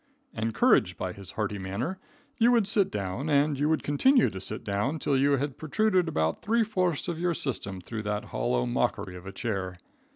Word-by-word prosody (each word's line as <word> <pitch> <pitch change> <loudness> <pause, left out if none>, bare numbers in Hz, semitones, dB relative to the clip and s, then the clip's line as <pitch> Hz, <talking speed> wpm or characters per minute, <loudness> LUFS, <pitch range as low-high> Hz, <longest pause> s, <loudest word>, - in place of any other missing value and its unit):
Encouraged 110 -4 +2
by 90 -1 -3
his 100 0 -11
hearty 105 -2 -2
manner, 100 - -3 0.4
you 235 +1 +5
would 230 -5 +3
sit 200 -2 +3
down, 100 +8 -3
and 145 -1 +2
you 150 +1 +2
would 160 - +1
continue 250 - +4
to 95 - -7
sit 95 - -4
down 105 +10 -1
till 145 -2 0
you 140 +2 +3
had 140 0 -1
protruded 185 +3 +2
about 80 - 0
three 230 +2 +2
fourths 185 -7 0
of 170 -2 -3
your 175 -1 0
system 100 -10 -3
through 110 +5 -6
that 105 0 -2
hollow - - 0
mockery 90 +10 -1
of 90 +1 -10
a - - -5
chair. 95 -5 -3
125 Hz, 195 wpm, -28 LUFS, -, 0.4 s, you